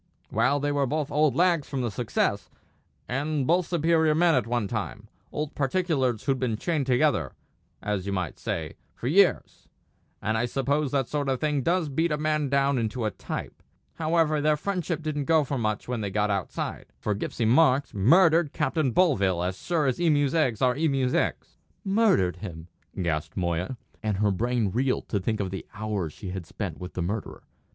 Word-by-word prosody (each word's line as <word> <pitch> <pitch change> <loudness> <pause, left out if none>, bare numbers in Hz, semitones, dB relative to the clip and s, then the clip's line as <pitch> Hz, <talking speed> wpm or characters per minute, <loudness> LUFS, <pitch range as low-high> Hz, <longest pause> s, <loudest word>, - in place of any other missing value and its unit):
"Well, 140 +3 +2
they 145 +1 0
were 140 -1 +1
both 150 +2 -2
old 150 -1 +2
lags 170 -4 +2
from 135 -2 -2
the 120 -3 -1
Success, 95 - -1 0.6
and 140 +2 -1
both 175 +4 +2
superior 160 -2 +2
men 170 +1 +4
at 130 -4 +1
one 120 -3 0
time; 105 0 -4 0.2
old 150 0 -3
particulars 135 - 0
who'd 135 -2 0
been 120 -4 -1
chained 150 0 -1
together, 130 0 +2 0.5
as 100 -2 -2
you - - -1
might 90 -4 -3
say, - - -4 0.2
for - - -9
years; 185 +8 +2 0.5
and 110 +1 -1
I 120 - +1
suppose 140 +3 0
that 135 -2 0
sort 145 -2 -2
of 130 -2 0
thing 150 -2 0
does 170 +3 +1
beat 160 +4 0
a 150 - +1
man 150 -1 0
down 140 -1 +2
into 115 +1 -2
a 110 - 0
type. - - -6 0.4
However, 155 -2 +2
their 150 0 +3
friendship 175 -2 -2
didn't 150 -2 -2
go 160 0 +4
for 140 -1 -3
much 110 -2 -2
when 125 -2 -2
they 100 - -2
got 105 +1 0
outside; 100 -3 -3
for 105 - -1
Gipsy 110 +3 -3
Marks 135 +3 +4
murdered 165 - +4
Captain 155 -2 0
Bovill 100 - +2
as 90 +1 -2
sure 165 -4 0
as 130 +5 0
emu's 145 -5 +3
eggs 135 -8 +1
are 125 -1 +3
emu's 135 -5 +1
eggs!" - - -1 0.3
"Murdered 195 - +3
him!" 85 -3 -8 0.3
gasped 80 -3 -2
Moya; 90 +6 -1 0.2
and 105 -3 -1
her 105 0 +2
brain 115 +1 0
reeled 125 +4 0
to 100 - 0
think 110 +3 -2
of 95 -2 -2
the 95 - -5
hours 105 -6 -3
she 95 +5 -8
had 90 -3 -6
spent - - -5
with 90 0 -7
the 90 - -1
murderer. 100 +5 -4
135 Hz, 190 wpm, -26 LUFS, 105-155 Hz, 0.6 s, men